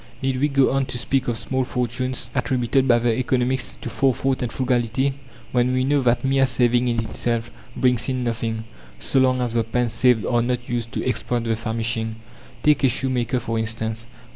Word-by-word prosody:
Need 130 Hz, -1 st, 0 dB
we 145 Hz, -, +4 dB
go 140 Hz, -2 st, +3 dB
on 135 Hz, 0 st, 0 dB
to 125 Hz, -, -4 dB
speak 130 Hz, +3 st, 0 dB
of 120 Hz, -2 st, 0 dB
small 130 Hz, +3 st, -1 dB
fortunes 125 Hz, +1 st, -3 dB
attributed 130 Hz, 0 st, +1 dB
by 120 Hz, -2 st, +5 dB
the 120 Hz, -1 st, +1 dB
economists 130 Hz, +1 st, 0 dB
to -, -, -4 dB
forethought 135 Hz, 0 st, +1 dB
and 120 Hz, -, -2 dB
frugality, 130 Hz, +1 st, 0 dB, 0.4 s
when 125 Hz, 0 st, +2 dB
we 130 Hz, 0 st, +1 dB
know 140 Hz, +1 st, +2 dB
that 125 Hz, 0 st, +1 dB
mere 135 Hz, 0 st, +3 dB
saving 125 Hz, 0 st, +2 dB
in 120 Hz, -1 st, 0 dB
itself 115 Hz, +1 st, -2 dB, 0.2 s
brings 125 Hz, -1 st, +2 dB
in 130 Hz, -1 st, -1 dB
nothing, 115 Hz, -1 st, -2 dB, 0.3 s
so 135 Hz, -, +1 dB
long 130 Hz, -1 st, +3 dB
as 120 Hz, -2 st, -1 dB
the 115 Hz, -1 st, +2 dB
pence 115 Hz, 0 st, 0 dB
saved 120 Hz, -4 st, +3 dB
are 120 Hz, -1 st, +2 dB
not 125 Hz, 0 st, -2 dB
used 120 Hz, -1 st, -3 dB
to -, -, -2 dB
exploit 120 Hz, -1 st, -1 dB
the 115 Hz, -1 st, 0 dB
famishing? 110 Hz, 0 st, -2 dB, 0.5 s
Take 150 Hz, -1 st, +3 dB
a 135 Hz, -, +5 dB
shoemaker, 125 Hz, 0 st, 0 dB
for 115 Hz, -1 st, -2 dB
instance. 110 Hz, 0 st, -3 dB
125 Hz, 190 wpm, -22 LUFS, 115-130 Hz, 0.5 s, by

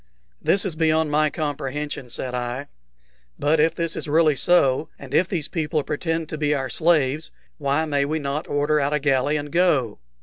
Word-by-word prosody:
"This 195 Hz, -, +2 dB
is 180 Hz, -5 st, -2 dB
beyond 160 Hz, -1 st, +2 dB
my 155 Hz, +1 st, +3 dB
comprehension," 145 Hz, -3 st, -4 dB
said 125 Hz, +1 st, -4 dB
I. 125 Hz, +3 st, -4 dB, 0.7 s
"But 150 Hz, +2 st, +2 dB
if 160 Hz, +2 st, +3 dB
this 165 Hz, -1 st, -2 dB
is -, -, -4 dB
really 155 Hz, 0 st, +3 dB
so, 150 Hz, -1 st, +3 dB
and 135 Hz, -1 st, -11 dB
if 175 Hz, +4 st, +3 dB
these 170 Hz, -6 st, -2 dB
people 155 Hz, -3 st, -1 dB
pretend 160 Hz, +2 st, -2 dB
to 155 Hz, -, -5 dB
be 150 Hz, -1 st, +1 dB
our 135 Hz, -2 st, -3 dB
slaves, 155 Hz, -3 st, +1 dB, 0.3 s
why 145 Hz, +2 st, +1 dB
may 145 Hz, -2 st, +1 dB
we 155 Hz, +2 st, -1 dB
not 145 Hz, 0 st, -3 dB
order 145 Hz, +1 st, +1 dB
out 140 Hz, +1 st, 0 dB
a -, -, +1 dB
galley 140 Hz, +1 st, +1 dB
and 145 Hz, 0 st, -5 dB
go?" 150 Hz, -, +2 dB
150 Hz, 190 wpm, -23 LUFS, 140-160 Hz, 0.7 s, my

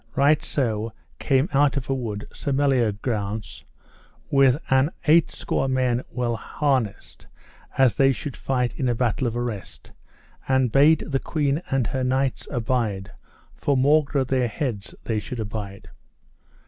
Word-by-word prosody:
Right 145 Hz, +2 st, +4 dB
so 115 Hz, -4 st, -2 dB, 0.3 s
came 135 Hz, +2 st, +2 dB
out 140 Hz, +1 st, +3 dB
of 135 Hz, -, -3 dB
a 135 Hz, -, 0 dB
wood 110 Hz, -6 st, -4 dB
Sir 140 Hz, -, -4 dB
Meliagrance 110 Hz, -6 st, -1 dB, 0.7 s
with 135 Hz, -2 st, +5 dB
an 135 Hz, +2 st, +4 dB, 0.2 s
eight 165 Hz, +2 st, +5 dB
score 135 Hz, -, -2 dB
men 130 Hz, -2 st, +1 dB
well 120 Hz, -2 st, -1 dB
harnessed, 130 Hz, -2 st, -2 dB, 0.5 s
as 130 Hz, -3 st, +5 dB
they 135 Hz, 0 st, +5 dB
should 135 Hz, +1 st, -5 dB
fight 125 Hz, -2 st, -1 dB
in 130 Hz, -, +1 dB
a 120 Hz, -, +1 dB
battle 120 Hz, +1 st, 0 dB
of 115 Hz, 0 st, -3 dB
arrest, 120 Hz, -5 st, -6 dB, 0.6 s
and 130 Hz, -3 st, +2 dB
bade 145 Hz, +5 st, +5 dB
the 135 Hz, -2 st, -1 dB
queen 145 Hz, 0 st, -1 dB
and 135 Hz, -3 st, +1 dB
her 130 Hz, +3 st, -2 dB
knights 130 Hz, +1 st, 0 dB
abide, 115 Hz, -6 st, -1 dB, 0.4 s
for 140 Hz, -2 st, 0 dB
maugre 140 Hz, 0 st, +3 dB
their 130 Hz, -1 st, +1 dB
heads 115 Hz, -4 st, -4 dB
they 110 Hz, -2 st, -1 dB
should 115 Hz, +3 st, -7 dB
abide. 105 Hz, -2 st, -6 dB
130 Hz, 145 wpm, -24 LUFS, 115-135 Hz, 0.7 s, with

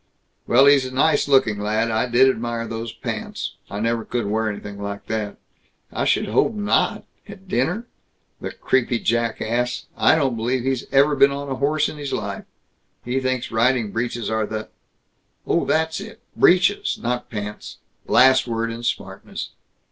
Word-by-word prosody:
"Well, 130 Hz, +4 st, +6 dB
he's 140 Hz, -1 st, +6 dB
a -, -, -8 dB
nice 145 Hz, +3 st, +2 dB
looking 130 Hz, -7 st, +3 dB
lad. 110 Hz, +2 st, 0 dB
I 110 Hz, +3 st, +1 dB
did 125 Hz, +2 st, +5 dB
admire 120 Hz, -2 st, -1 dB
those 115 Hz, 0 st, -5 dB
pants. -, -, -5 dB, 0.2 s
I 100 Hz, -, -5 dB
never 115 Hz, +1 st, 0 dB
could 120 Hz, -1 st, -2 dB
wear 110 Hz, +2 st, 0 dB
anything 100 Hz, -1 st, -7 dB
like 100 Hz, 0 st, -5 dB
that." 110 Hz, -2 st, -3 dB, 0.6 s
"I -, -, -1 dB
should -, -, +2 dB
hope 220 Hz, -, +2 dB
not 205 Hz, -1 st, +1 dB, 0.3 s
at 190 Hz, 0 st, -12 dB
dinner! 215 Hz, +4 st, 0 dB, 0.5 s
The -, -, -5 dB
creepy 125 Hz, -2 st, 0 dB
jack 115 Hz, 0 st, 0 dB
ass, 120 Hz, +2 st, -1 dB
I -, -, +4 dB
don't 135 Hz, -6 st, +1 dB
believe 120 Hz, +3 st, -1 dB
he's 130 Hz, -2 st, -1 dB
ever 140 Hz, +2 st, +4 dB
been 140 Hz, -, +6 dB
on 140 Hz, 0 st, -5 dB
a -, -, -1 dB
horse 150 Hz, +2 st, +1 dB
in 155 Hz, -, -7 dB
his 145 Hz, -1 st, -4 dB
life! -, -, -4 dB, 0.6 s
He 125 Hz, +2 st, 0 dB
thinks 130 Hz, -1 st, -2 dB
riding 115 Hz, -1 st, +2 dB
breeches 115 Hz, 0 st, -2 dB
are 110 Hz, -1 st, 0 dB
the 110 Hz, 0 st, -5 dB, 0.4 s
" -, -, -46 dB
"Oh, -, -, +1 dB
that's 160 Hz, +1 st, 0 dB
it. 210 Hz, +3 st, -10 dB, 0.2 s
Breeches, 185 Hz, +3 st, +3 dB
not 125 Hz, +1 st, -3 dB
pants." 105 Hz, -1 st, -6 dB, 0.2 s
" -, -, -46 dB
last 130 Hz, 0 st, +5 dB
word 115 Hz, 0 st, -1 dB
in 115 Hz, +1 st, -6 dB
smartness. 120 Hz, -, -4 dB
120 Hz, 175 wpm, -22 LUFS, 110-140 Hz, 0.6 s, Well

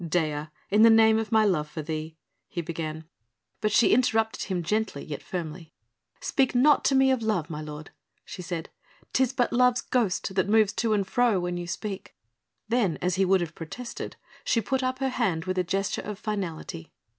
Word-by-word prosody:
"Dea... 155 Hz, -3 st, -1 dB, 0.2 s
in 210 Hz, +2 st, +4 dB
the 230 Hz, -, +9 dB
name 220 Hz, 0 st, +6 dB
of 225 Hz, 0 st, -4 dB
my 220 Hz, -1 st, +5 dB
love 155 Hz, -7 st, +1 dB
for 155 Hz, 0 st, -6 dB
thee 160 Hz, +1 st, -5 dB
..." -, -, -51 dB
he -, -, -5 dB
began. 160 Hz, -1 st, -4 dB, 0.6 s
But 215 Hz, -, +1 dB
she 215 Hz, -, +5 dB
interrupted 225 Hz, -2 st, +2 dB
him 180 Hz, -3 st, -2 dB
gently, 210 Hz, -4 st, -1 dB
yet 145 Hz, -, -6 dB
firmly. 165 Hz, -2 st, -6 dB, 0.5 s
"Speak 265 Hz, -2 st, +1 dB
not 285 Hz, +4 st, +5 dB
to 275 Hz, -, +3 dB
me 265 Hz, 0 st, +5 dB
of 260 Hz, -3 st, +1 dB
love, 195 Hz, -7 st, -1 dB
my 150 Hz, 0 st, -4 dB
lord," 150 Hz, 0 st, -8 dB, 0.3 s
she 185 Hz, -, -8 dB
said. 175 Hz, -2 st, -5 dB, 0.4 s
"'Tis 260 Hz, -2 st, +3 dB
but 250 Hz, -3 st, 0 dB
love's 250 Hz, 0 st, +4 dB
ghost 200 Hz, -6 st, 0 dB
that 190 Hz, +1 st, +1 dB
moves 215 Hz, -2 st, +4 dB
to 225 Hz, -2 st, 0 dB
and 200 Hz, -2 st, +1 dB
fro 230 Hz, 0 st, +2 dB
when 175 Hz, 0 st, -2 dB
you 175 Hz, 0 st, -5 dB
speak." 195 Hz, +2 st, -5 dB, 0.5 s
Then 220 Hz, -8 st, +1 dB
as 180 Hz, +1 st, 0 dB
he 190 Hz, +2 st, +2 dB
would 190 Hz, 0 st, +3 dB
have 170 Hz, -2 st, -4 dB
protested, 230 Hz, +9 st, -7 dB, 0.3 s
she 230 Hz, -, +2 dB
put 260 Hz, +5 st, -1 dB
up 255 Hz, 0 st, -1 dB
her 270 Hz, 0 st, 0 dB
hand 190 Hz, -11 st, -1 dB
with 185 Hz, 0 st, -1 dB
a -, -, +2 dB
gesture 195 Hz, +3 st, -1 dB
of 210 Hz, -1 st, -6 dB
finality. 185 Hz, -, -5 dB
195 Hz, 200 wpm, -27 LUFS, 165-225 Hz, 0.6 s, the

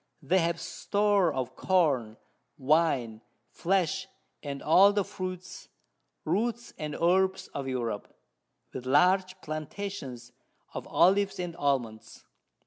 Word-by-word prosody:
They 190 Hz, +2 st, +3 dB
have 170 Hz, 0 st, 0 dB
Store 205 Hz, -4 st, +1 dB
of 130 Hz, -2 st, -4 dB
Corn, 140 Hz, -12 st, +1 dB, 0.4 s
Wine, 130 Hz, -6 st, +1 dB, 0.3 s
Flesh, 190 Hz, +1 st, 0 dB, 0.3 s
and 140 Hz, -2 st, -6 dB
all 190 Hz, +6 st, +6 dB
the 205 Hz, -1 st, +1 dB
Fruits, 185 Hz, -1 st, -7 dB, 0.6 s
Roots, 230 Hz, +8 st, -1 dB
and 150 Hz, -1 st, -4 dB
Herbs 190 Hz, +2 st, +2 dB
of 140 Hz, -1 st, -5 dB
Europe, 120 Hz, -5 st, -3 dB, 0.7 s
with 130 Hz, 0 st, -6 dB
large 185 Hz, +6 st, +3 dB
Plantations 155 Hz, -6 st, -6 dB, 0.4 s
of -, -, -6 dB
Olives 195 Hz, +2 st, +3 dB
and 175 Hz, -2 st, -4 dB
Almonds. 120 Hz, -8 st, -2 dB
165 Hz, 110 wpm, -29 LUFS, 130-190 Hz, 0.7 s, all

